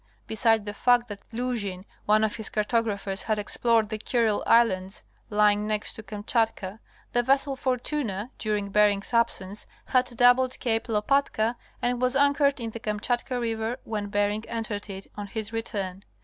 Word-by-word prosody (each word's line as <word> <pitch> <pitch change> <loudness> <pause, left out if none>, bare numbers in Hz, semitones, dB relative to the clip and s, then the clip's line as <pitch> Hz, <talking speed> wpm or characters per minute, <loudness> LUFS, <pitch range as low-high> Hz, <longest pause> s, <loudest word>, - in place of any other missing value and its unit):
Beside 220 -1 +2
the 205 - -4
fact 245 +1 +3
that 200 -1 -7
Luzhin, 225 -6 -3 0.2
one 215 +1 +4
of 220 +2 0
his 220 - -4
cartographers, 210 -3 -1
had 215 +1 0
explored 220 +1 +1
the 215 -1 -4
Kurile 225 -2 +1
Islands 195 -5 +3 0.3
lying 210 0 +3
next 215 0 -1
to - - -6
Kamchatka, 215 -1 -1 0.3
the 240 - +2
vessel 275 +2 +2
Fortuna 250 -4 -2
during 210 -2 -1
Bering's 205 +1 +3
absence 210 -4 0 0.2
had 255 -1 +3
doubled 245 +1 +3
Cape 225 -1 0
Lopatka 225 +1 +1 0.3
and 245 0 0
was 255 +1 +1
anchored 285 0 +3
in 230 -1 -4
the 230 - -7
Kamchatka 240 +4 -1
River 225 0 -2
when 210 -2 -3
Bering 205 +1 0
entered 220 -3 -4
it 195 0 -7
on 205 -1 -5
his 220 +1 -5
return. 200 -4 -3
220 Hz, 155 wpm, -26 LUFS, 205-240 Hz, 0.3 s, one